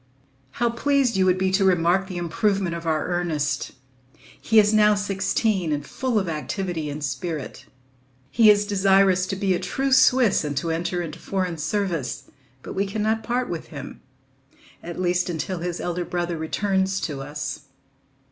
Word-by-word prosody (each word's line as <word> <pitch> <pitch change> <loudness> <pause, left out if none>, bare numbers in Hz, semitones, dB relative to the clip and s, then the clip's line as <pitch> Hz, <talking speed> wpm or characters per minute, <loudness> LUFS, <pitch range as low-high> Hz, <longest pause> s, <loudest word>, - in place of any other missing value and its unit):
How 240 -1 0
pleased 270 0 +1
you 190 -1 +3
would 185 0 +3
be 190 0 +1
to 195 +1 +2
remark 185 +1 +3
the 185 -2 -6
improvement 185 +2 0
of 170 0 -6
our 155 -1 0
Ernest! 175 -5 -1 0.4
He 225 - -2
is 210 0 +6
now 210 -1 +5
sixteen 195 -2 0
and 145 -1 -2
full 255 -4 -2
of 195 -3 0
activity 165 0 -3
and 145 +1 -5
spirit. 160 -1 -5 0.6
He 220 +3 +6
is 205 0 +5
desirous 195 -2 +3
to 195 - -2
be 195 -1 +1
a 175 - -1
true 270 0 -2
Swiss 255 -6 +5
and 145 -2 -3
to 165 +4 -1
enter 175 +2 -2
into 155 -3 -7
foreign 185 -4 -3
service, 150 - -2 0.3
but - - -7
we 195 +1 -1
cannot 220 +2 -1
part 245 +2 -1
with 170 -2 -5
him, 140 -3 -9 0.8
at 170 +1 -7
least 180 0 +1
until 175 +2 -3
his 175 0 -3
elder 175 0 -2
brother 175 0 -2
returns 190 +4 0
to 140 -4 -4
us. 145 +2 -6
185 Hz, 165 wpm, -24 LUFS, 165-205 Hz, 0.8 s, is